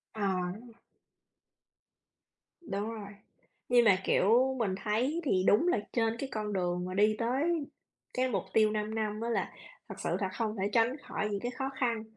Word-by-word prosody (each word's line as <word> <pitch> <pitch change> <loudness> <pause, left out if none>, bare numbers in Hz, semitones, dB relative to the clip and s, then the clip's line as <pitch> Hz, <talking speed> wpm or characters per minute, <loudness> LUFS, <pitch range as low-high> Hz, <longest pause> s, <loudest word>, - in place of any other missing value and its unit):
À. 185 -4 -1 2.1
Đúng 205 - -3
rồi. 205 -3 -8 0.6
Nhưng 245 -1 +5
mà, 200 -4 +6
kiểu, 250 +6 +4
mình 200 -5 0
thấy 250 +10 0
thì 190 -11 +2
đúng 215 +12 +5
là 355 - +3
trên 225 -1 +1
cái 275 - -3
con 210 -1 -3
đường 180 -1 -1
mà 185 - -5
đi 210 +3 +3
tới 285 +8 0 0.5
cái 255 +1 +1
mục 195 -7 -1
tiêu 215 -1 +4
5 215 +1 -2
năm 215 -1 -2
á 230 - -2
là 235 - -1 0.4
thật - - -6
sự - - -1
là 190 - 0
không 215 +2 -2
thể 200 - +1
tránh 235 +3 +3
khỏi 210 -7 -3
những 200 -1 -2
cái 245 +4 -3
khó 265 +1 -3
khăn. 235 -4 0
220 Hz, 180 wpm, -31 LUFS, 200-245 Hz, 2.1 s, mà